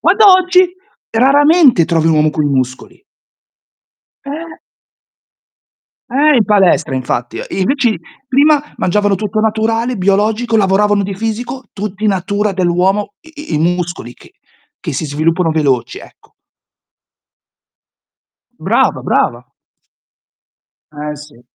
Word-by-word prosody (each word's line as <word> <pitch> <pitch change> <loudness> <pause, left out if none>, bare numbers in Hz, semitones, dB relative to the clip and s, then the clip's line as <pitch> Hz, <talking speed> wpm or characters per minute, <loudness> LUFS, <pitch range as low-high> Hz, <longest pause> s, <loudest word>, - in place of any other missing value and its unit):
Guarda 395 +5 +5
oggi, 370 0 +4 0.4
raramente 275 - +4
trovi 165 -1 0
un 160 - +3
uomo 155 0 +2
con 150 -1 -2
i - - +1
muscoli. 130 - -3 1.2
Eh. 315 +4 -8 1.5
Eh, 290 +4 +3
in 225 - +3
palestra 185 -8 +2
infatti. 120 -2 -3
Invece 245 +7 0
i 215 - -4 0.3
prima 285 +2 +3 0.2
mangiavano 205 +2 +1
tutto 210 +2 -2
naturale, 225 +2 -1
biologico, 215 +4 0
lavoravano 205 0 +2
di 195 0 -4
fisico, 225 +5 -5
tutti 210 +1 -4
natura 200 +1 -1
dell'uomo 190 +3 0
i 315 - -11
i - - 0
i - - +1
muscoli 175 -7 -2
che - - -19 0.5
che - - -5
si 145 - -3
sviluppano 160 +4 0
veloci, 140 -7 -1
ecco. - - -18 2.3
Brava, - - 0
brava. 120 +1 -1 1.5
Eh 150 0 -6
sì. 145 -5 -14
205 Hz, 115 wpm, -14 LUFS, 165-245 Hz, 2.3 s, Guarda